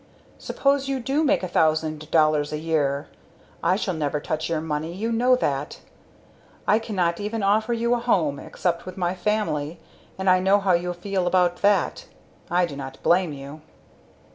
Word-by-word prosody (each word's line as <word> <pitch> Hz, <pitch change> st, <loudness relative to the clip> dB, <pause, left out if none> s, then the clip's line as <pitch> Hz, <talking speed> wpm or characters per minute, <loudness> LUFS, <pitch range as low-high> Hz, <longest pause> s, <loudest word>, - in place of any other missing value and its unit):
Suppose 275 Hz, 0 st, 0 dB
you 270 Hz, -1 st, -1 dB
do 270 Hz, +5 st, 0 dB
make 280 Hz, -, +2 dB
a -, -, -1 dB
thousand 155 Hz, -2 st, 0 dB
dollars 155 Hz, -2 st, +3 dB
a 150 Hz, -, -2 dB
year 150 Hz, -3 st, 0 dB, 0.5 s
I 185 Hz, -, +3 dB
shall 195 Hz, -2 st, -2 dB
never 150 Hz, -2 st, -1 dB
touch 155 Hz, +2 st, -3 dB
your 165 Hz, -2 st, 0 dB
money 155 Hz, +1 st, -3 dB
you 215 Hz, +6 st, -3 dB
know 250 Hz, +3 st, +4 dB
that. 145 Hz, -, -2 dB, 0.9 s
I 215 Hz, -, +4 dB
cannot 185 Hz, -7 st, -1 dB
even 210 Hz, +1 st, -3 dB
offer 215 Hz, +4 st, +2 dB
you 235 Hz, +1 st, +1 dB
a 245 Hz, -, +1 dB
home, 170 Hz, -, +1 dB
except 170 Hz, -1 st, -3 dB
with 185 Hz, -, -8 dB
my 175 Hz, -1 st, 0 dB
family, 175 Hz, -5 st, -1 dB, 0.4 s
and 190 Hz, 0 st, -3 dB
I 185 Hz, 0 st, +6 dB
know 190 Hz, +2 st, +4 dB
how 195 Hz, -2 st, +1 dB
you 175 Hz, +1 st, 0 dB
feel 185 Hz, +1 st, -2 dB
about 175 Hz, -1 st, +2 dB
that; 205 Hz, +1 st, +1 dB, 0.4 s
I 180 Hz, +1 st, +3 dB
do 155 Hz, -5 st, -7 dB
not 135 Hz, -1 st, -7 dB
blame 175 Hz, -1 st, +3 dB
you. 140 Hz, +2 st, -9 dB
175 Hz, 175 wpm, -24 LUFS, 155-210 Hz, 0.9 s, I